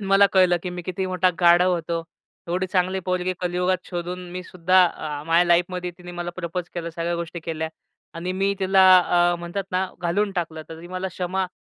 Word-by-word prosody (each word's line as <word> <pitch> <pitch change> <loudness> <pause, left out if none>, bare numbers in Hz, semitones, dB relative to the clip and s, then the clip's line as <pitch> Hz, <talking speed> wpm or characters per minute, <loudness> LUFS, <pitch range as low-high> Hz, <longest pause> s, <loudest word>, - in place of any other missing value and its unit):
मला 195 0 +5
कळलं, 185 -2 +5
की 180 - -4
मी 180 0 -6
किती 185 +2 -3
मोठा 185 0 +2
गाढव 175 +1 +5
होतो. 170 -1 -2 0.5
एवढी 185 +2 0
चांगली 185 0 0
पोरगी 185 0 0
कलियुगात 180 +1 +1
शोधून 180 0 -5
मी 180 +1 -5
सुद्धा 185 +1 +3
अ, 150 -3 -5
माझ्या 165 +2 +4
लाईफमध्ये 175 +1 +1
तिने 175 0 -10
मला 175 0 -4
प्रपोज 175 0 -4
केलं. 170 -1 -4
सगळ्या 170 +1 -2
गोष्टी 170 0 -5
केल्या 160 -1 -3 0.5
आणि 175 +2 -3
मी 195 +1 0
तिला 190 0 +3 0.5
अ, - - 0
म्हणतात 175 +3 -4
ना, 185 +1 0
घालवून 195 +4 0
टाकलं. 165 -4 -3
तर 165 0 -9
ती 175 - -10
मला 185 +1 -3
क्षमा 185 +1 -2
180 Hz, 190 wpm, -23 LUFS, 170-185 Hz, 0.5 s, मला